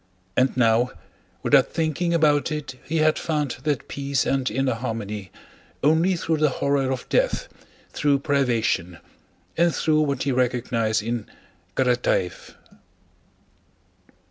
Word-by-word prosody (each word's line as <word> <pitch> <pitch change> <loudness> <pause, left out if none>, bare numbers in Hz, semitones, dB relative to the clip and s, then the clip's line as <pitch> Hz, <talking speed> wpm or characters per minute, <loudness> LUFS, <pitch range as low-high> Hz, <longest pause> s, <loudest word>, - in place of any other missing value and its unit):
And 130 0 +2
now 115 0 +3 0.5
without - - +5
thinking 165 +2 -1
about 155 -2 +3
it 150 -3 -4
he 165 +4 -2
had 155 0 +3
found 150 -6 -2
that 145 -3 -1
peace 140 -1 -1
and 135 -1 0
inner 135 -1 0
harmony 105 -4 -5 0.5
only 160 +5 +3
through 160 -1 -1
the 150 0 +3
horror 135 0 0
of 130 -1 -4
death, - - +1 0.4
through 145 -1 +2
privation, 120 - 0 0.6
and 170 0 +3
through 155 -1 +2
what 140 -3 0
he 140 - 0
recognized 115 -3 0
in 115 -1 -3 0.5
Karatáev. 125 -8 0
135 Hz, 120 wpm, -24 LUFS, 120-155 Hz, 0.6 s, without